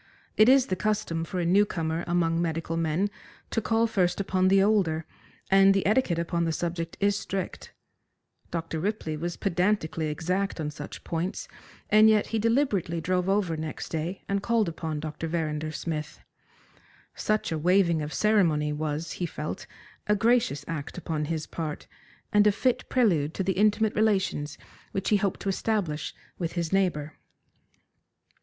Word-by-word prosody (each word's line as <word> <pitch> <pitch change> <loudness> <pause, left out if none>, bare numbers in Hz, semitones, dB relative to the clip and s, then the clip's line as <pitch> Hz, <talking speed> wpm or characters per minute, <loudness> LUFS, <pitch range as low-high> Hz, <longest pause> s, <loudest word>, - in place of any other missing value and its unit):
It 215 +3 +6
is 265 -1 +6
the 185 - -1
custom 180 -5 -1
for 180 +3 -4
a 175 - 0
new 190 +4 +5
comer 165 -4 -2
among 170 -1 +1
medical 165 -1 -2
men 165 +5 0 0.4
to 225 - 0
call 225 +2 +2
first 185 -6 +1
upon 185 -1 +1
the 195 +1 +5
older, 180 -7 +2 0.5
and 195 0 +6
the 195 - +1
etiquette 210 -5 +2
upon 170 0 -1
the 165 - 0
subject 165 0 -3
is 200 0 +2
strict. 195 -2 -4 0.8
Dr. 165 -1 -3
Ripley 185 -4 -2
was 170 +3 -4
pedantically 180 -4 0
exact 180 +6 -1
on 150 -1 -2
such 145 0 -9
points, 170 +4 -3 0.4
and 215 +1 +7
yet 215 -1 +4
he 225 - +2
deliberately 220 - +1
drove 180 +2 0
over 195 -4 +1
next 155 0 -5
day 165 +4 -3
and 200 0 0
called 230 -2 +2
upon 160 -2 -4
Dr. 155 +1 -4
Verrinder 155 -2 -2
Smith. 155 -1 -4 0.9
Such 215 -4 -1
a 160 - -1
waiving 175 -1 +3
of 150 0 -4
ceremony 165 -9 +2
was, 155 +1 -3
he 175 - -3
felt, 155 -1 -6 0.4
a 210 - +4
gracious 225 - +2
act 160 -1 -5
upon 160 -3 -2
his 160 0 -3
part, 155 -3 -5 0.5
and 210 0 +6
a - - +6
fit 250 +4 0
prelude 170 - +2
to 190 - -1
the 190 +1 +1
intimate 210 +2 +2
relations 195 -9 0 0.4
which 195 0 -1
he 210 - +5
hoped 200 -2 -1
to 200 - -2
establish 190 -7 -1 0.2
with 170 -2 -2
his 170 0 -2
neighbour. 155 -6 0
175 Hz, 165 wpm, -27 LUFS, 160-205 Hz, 0.9 s, and